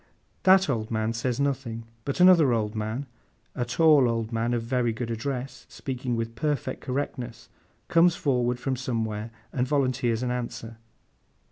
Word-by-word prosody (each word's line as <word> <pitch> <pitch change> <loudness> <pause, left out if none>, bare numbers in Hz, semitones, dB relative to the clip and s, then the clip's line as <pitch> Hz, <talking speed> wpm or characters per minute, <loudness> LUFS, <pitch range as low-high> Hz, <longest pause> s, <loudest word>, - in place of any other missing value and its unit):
That 190 0 +6
old 115 -5 -1
man 110 0 -1
says 120 +2 -2
nothing; 130 -5 -1 0.2
but 140 - -2
another 175 -8 +7
old 105 -2 0
man, 110 +5 -3 0.5
a 125 - -1
tall 145 0 +5
old 115 -1 -2
man 115 +1 0
of 115 - -2
very 120 0 0
good 115 +1 -4
address, 125 +1 -4
speaking 130 -2 -4
with 115 0 -3
perfect 140 +1 -2
correctness, 125 -3 -4 0.4
comes 170 0 +4
forward 125 -3 0
from 135 +1 -1
somewhere, 115 -3 -3 0.2
and 125 -1 0
volunteers 130 -4 +1
an 125 - -1
answer. 120 -2 -5
125 Hz, 150 wpm, -26 LUFS, 115-135 Hz, 0.5 s, another